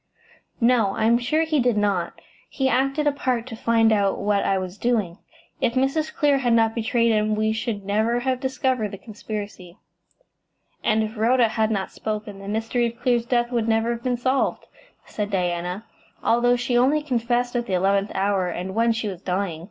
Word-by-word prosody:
"No; 230 -5 +3
I - - 0
am 235 +1 +4
sure 305 +6 +1
he 315 -2 0
did 245 -3 +2
not. 200 -4 -1 0.3
He 265 -2 -1
acted 275 +3 +1
a 295 - +4
part 255 -4 -1
to 250 -3 -7
find 225 0 +3
out 200 -2 +1
what 200 0 +1
I 195 - +1
was 185 +1 -5
doing. 215 -7 0 0.4
If 235 - +1
Mrs. 275 +4 0
Clear 285 -2 +2
had 245 -3 +1
not 225 -1 +3
betrayed 230 0 +1
him 215 0 +1
we 215 0 +1
should 220 -3 -3
never 220 +4 +1
have 260 0 -1
discovered 260 -4 -1
the 200 - -8
conspiracy." 205 -4 -8 1.1
"And 220 0 +2
if 215 +1 -5
Rhoda 235 +1 +3
had 220 0 0
not 200 -3 -2
spoken, 210 -2 -5
the 195 - -9
mystery 225 +3 0
of 235 +1 -8
Clear's 240 -2 +1
death 240 0 +1
would 235 -2 0
never 225 +1 +1
have 235 -1 -4
been 245 0 -1
solved," 260 +2 0 0.4
said 205 -1 -4
Diana, 180 +1 -2 0.4
"although 245 +1 +3
she 245 0 -1
only 275 +5 +3
confessed 245 -2 -1
at 240 0 -1
the 190 - -3
eleventh 195 +2 +2
hour, 195 -1 +1
and 180 +2 -5
when 230 +2 +2
she 225 -1 -3
was 185 -3 -6
dying." 185 -3 -2
225 Hz, 190 wpm, -23 LUFS, 205-245 Hz, 1.1 s, am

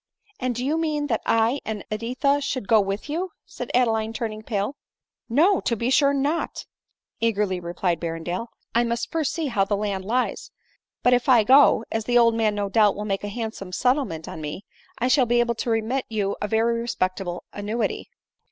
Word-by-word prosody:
" 415 - -35
And 250 -1 -1
do 245 +2 -3
you 310 +4 +1
mean 305 -2 0
that - - 0
I 230 +5 +2
and 215 -2 -5
Editha 255 +6 0
should 255 -6 -3
go 220 -2 +5
with 195 +4 -3
you 335 +4 -3
?" - - -60
said 245 - -7
Adeline 225 -3 +2
turning 220 -2 -4
pale. 205 0 -2
P 285 - -28 0.6
No, 360 +6 +5
to 235 - 0
be 235 +3 -1
sure 280 +1 +5
not," 285 +4 -1 0.5
eagerly 210 -5 +1
replied 175 0 -1
Berrendale; 170 +5 -3
" - - -45
I 235 +1 +3
must 235 0 -2
first 320 -3 0
see 330 -1 -2
how 230 -8 +1
the 200 +1 0
land 200 -2 -2
lies. 245 +5 -1 0.5
But 245 - +5
if 245 +2 +2
I 240 -4 +7
go— 260 -2 +6
as 225 -1 -2
the 245 +1 +3
old 230 -1 +5
man 220 -2 +1
no 205 -1 -1
doubt 210 0 +3
will 210 - -4
make 195 -1 -2
a - - -3
handsome 215 -3 -5
settlement 250 - 0
on 160 - -7
me 155 +6 -6 0.2
— - - -29
I 245 - 0
shall 255 -1 +4
be 240 +1 +3
able 240 0 +2
to 235 - -4
remit 225 +4 0
you 205 -3 -1
a 210 - -1
very 230 +2 +1
respectable 185 -5 -2
annuity." 210 +3 -3
230 Hz, 210 wpm, -24 LUFS, 205-255 Hz, 0.6 s, I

